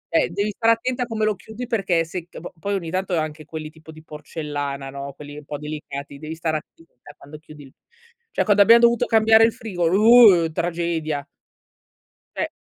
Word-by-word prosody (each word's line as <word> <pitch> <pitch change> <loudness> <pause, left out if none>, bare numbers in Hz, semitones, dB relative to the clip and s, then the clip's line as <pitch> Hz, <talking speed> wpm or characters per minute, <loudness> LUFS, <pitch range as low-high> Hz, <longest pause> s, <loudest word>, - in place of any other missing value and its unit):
Eh, - - +3
devi 200 +4 -2
stare 230 +2 +3
attenta 250 +2 -2
a - - -3
come 220 -2 -1
lo 215 - +1
chiudi 220 +5 -9
perché 190 -8 0
se 170 +1 -7
c - - -11
po 175 - -10
poi 200 +4 -2
ogni 170 -4 -4
tanto 185 -1 -1
anche 155 -1 -4
quelli 155 -1 -7
tipo 160 0 -15
di 155 0 -14
porcellana, 145 -3 -6
no, 140 0 -7
quelli 145 +1 -11
un - - -14
po' 145 - -6
delicati, 145 -1 -7
devi 155 +1 -7
stare 160 -1 -1
attenta 155 -3 -16 0.2
quando 150 +2 -13
chiudi 155 -1 -14
il 135 - -16 0.6
cioè - - 0
quando 205 -1 +4
abbiamo 230 +3 +7
dovuto 235 -1 +4
cambiare 220 0 +5
il 230 - 0
frigo, 185 -6 -3
uh 205 -5 +6
tragedia. 165 -3 -3 1.1
Cioè, - - -2
165 Hz, 195 wpm, -22 LUFS, 150-215 Hz, 1.1 s, abbiamo